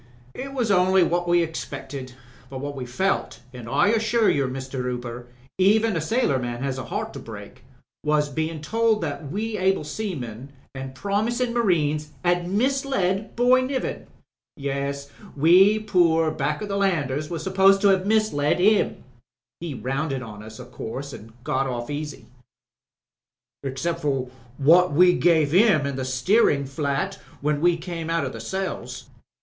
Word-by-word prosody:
"It 275 +1 -6
was 240 -6 0
only 185 0 +4
what 175 +1 0
we 175 0 +4
expected, 135 -5 -6 0.4
but 135 - -6
what 145 +1 -5
we 130 -2 -5
felt, 190 +11 -1
an* 125 -2 -9
I 160 - +3
assure 225 0 +3
you, 140 -2 +1
Mr. 130 0 -5
Hooper, 125 -1 -5 0.3
even 215 +2 +4
a 165 - 0
sailor 220 - +1
man 120 0 -4
has 135 -1 -2
a 130 - -5
heart - - -4
to - - -7
break, 105 -3 -10 0.4
was 150 -1 +2
bein' 155 +2 -3
told 225 +5 +1
that 145 -3 -4
we 215 +3 -3
able 190 -2 +2
seamen 140 - -5 0.2
an' 135 -1 -7
promisin' 220 - -1
marines 155 -9 +1
'ad 175 0 +1
misled 220 -4 0
Boy 250 +2 +4
Niven. 260 0 -3 0.5
Yes, 140 0 -3 0.3
we 185 +8 +6
poor 170 -6 +2
back 150 +4 -2
to - - -2
the 200 -1 -3
landers 155 -7 0
was 165 -2 -4
supposed 195 +1 +4
to 200 -1 +6
'ave 190 -1 0
misled 215 -9 +2
himi 205 +3 +3 0.6
He 165 -5 -5
rounded 135 +1 -2
on 105 -3 -9
us, 110 +1 -11
o' 125 - -8
course, 130 +3 -7
an' 110 +2 -11
got 135 +1 0
off 120 0 -4
easy." 150 0 -5 1.4
"Excep'for 135 -2 -2 0.3
what 165 +4 +5
we 180 +4 +6
gave 160 -4 +3
him 180 -5 +4
in 140 -1 -2
the 130 -1 -3
steerin' 140 - +2
flat 140 +1 -2 0.2
when 150 0 0
we 175 0 +3
came 165 -1 -5
out 165 0 0
o' - - -5
cells. 190 0 -5
160 Hz, 155 wpm, -24 LUFS, 135-195 Hz, 1.4 s, we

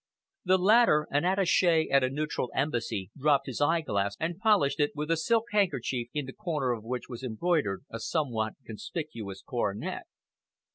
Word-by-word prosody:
The 185 +1 +4
latter, 190 -5 +5
an 145 +3 +1
attache 180 -3 +3
at 140 -1 +5
a 130 - +2
neutral 145 -2 -2
Embassy, 120 - -2
dropped 140 -1 +2
his 130 +1 -5
eyeglass 145 -11 +1
and 170 +2 -3
polished 195 -11 +3
it 145 0 +2
with 150 +2 -3
a - - +4
silk 225 +8 +1
handkerchief, 135 - 0
in 145 -1 -3
the 130 - -8
corner 155 -11 -2
of 115 -3 -3
which 125 +2 -4
was 120 -1 -8
embroidered 125 - -1
a 115 - -5
somewhat 115 -3 -1
conspicuous 110 - -6
coronet. 105 -5 -3
145 Hz, 160 wpm, -29 LUFS, 120-170 Hz, -, latter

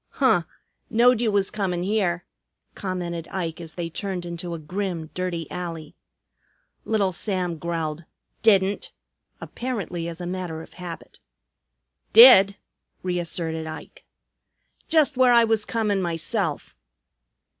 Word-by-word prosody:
"Huh! 215 -11 +3 0.4
Knowed 240 +1 +4
you 225 -3 +2
was 200 -1 +1
comin' 185 -4 -2
here," 185 -4 0 0.5
commented 175 -3 -4
Ike 170 -3 -4
as 165 -2 -9
they 175 -2 -3
turned 180 +1 -4
into 170 0 -5
a - - -5
grim, 170 0 -4
dirty 180 -3 -3
alley. 165 -4 -6 0.9
Little 205 -4 +1
Sam 180 -3 -2
growled, 165 -1 -3 0.4
"Didn't!" 200 -2 +3 0.5
apparently 195 -9 -4
as 170 0 -7
a 175 - -5
matter 175 -3 -4
of - - -16
habit. 175 -2 -9 0.9
"Did!" 205 -4 +9 0.5
reasserted 170 -3 -2
Ike. 160 - -9 0.8
"Just 310 -4 +3
where 255 -1 +5
I 235 -1 +7
was 220 -2 +1
comin' 210 -4 0
myself." 165 -3 -2
180 Hz, 120 wpm, -24 LUFS, 170-205 Hz, 0.9 s, Did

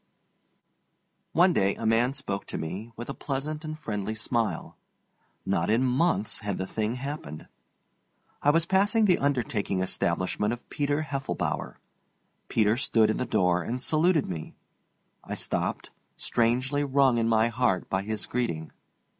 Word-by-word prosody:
One 175 +3 +5
day 100 -5 +2
a 115 - -5
man 115 +3 +3
spoke 130 -8 -4
to - - -4
me, 95 +8 -5
with 120 - -7
a 140 - -4
pleasant 150 +3 -3
and 155 0 -5
friendly 110 -6 -3
smile. 115 0 -2 0.7
Not 100 - 0
in 115 +4 +3
months 130 -2 +1
had 105 -3 -3
the 95 - -2
thing 110 +4 -2
happened. 130 - -6 0.9
I 145 - +3
was 165 +2 +4
passing 205 +5 +3
the 185 -3 +4
undertaking 120 -8 0
establishment 95 +3 0
of 120 - -9
Peter 145 +1 0
Heffelbower. 135 -2 -3 0.7
Peter 110 0 +2
stood 110 -4 +3
in - - -2
the 125 - -2
door 90 -5 +2
and 120 +9 -3
saluted 155 +3 +3
me. 80 -4 -6 0.7
I - - -5
stopped, - - -2 0.3
strangely 130 +5 +1
wrung 135 -3 +3
in 115 0 +1
my 110 0 +4
heart 120 -6 +1
by 95 - 0
his 105 +1 -3
greeting. 85 -11 -2
120 Hz, 145 wpm, -27 LUFS, 105-145 Hz, 0.9 s, One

